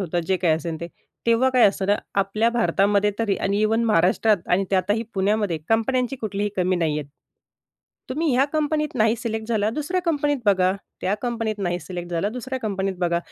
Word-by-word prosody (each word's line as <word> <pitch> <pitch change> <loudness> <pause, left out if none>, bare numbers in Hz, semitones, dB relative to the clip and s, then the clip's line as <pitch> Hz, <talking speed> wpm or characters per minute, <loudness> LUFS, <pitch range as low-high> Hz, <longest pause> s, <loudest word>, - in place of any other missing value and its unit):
होतं, 175 -2 -1
जे 190 +1 +2
काही 175 -3 +2
असेल 160 0 -4
ते, 170 - -4 0.4
तेव्हा 235 +3 +4
काय 255 -2 +3
असतं 195 -1 -3
ना, 205 +1 +3 0.2
आपल्या 215 +4 +1
भारतामध्ये 205 -3 +2
तरी 220 -4 +1
आणि 200 +2 0
इव्हन 225 +2 +2
महाराष्ट्रात 210 +1 +3
आणि 190 +2 +2
त्यातही 205 +3 +1
पुण्यामध्ये 200 -3 +1
कंपन्यांची 250 +3 +1
कुठलीही 210 -3 -2
कमी 185 0 +1
नाहीहेत. 155 -3 -1 1.1
तुम्ही 310 +4 0
ह्या 265 - +4
कंपनीत 305 -1 0
नाही 225 -1 +2
सिलेक्ट 220 -1 -4
झाला 215 -2 +1
दुसऱ्या 305 +8 -2
कंपनीत 290 -4 +1
बघा. 185 -2 +4 0.3
त्या 190 - 0
कंपनीत 230 -3 -2
नाही 175 -2 -1
सिलेक्ट 175 +2 -7
झाला 170 +4 0
दुसऱ्या 255 +3 -5
कंपनीत 195 -2 -2
बघा, 170 -1 +1
210 Hz, 175 wpm, -23 LUFS, 185-235 Hz, 1.1 s, तेव्हा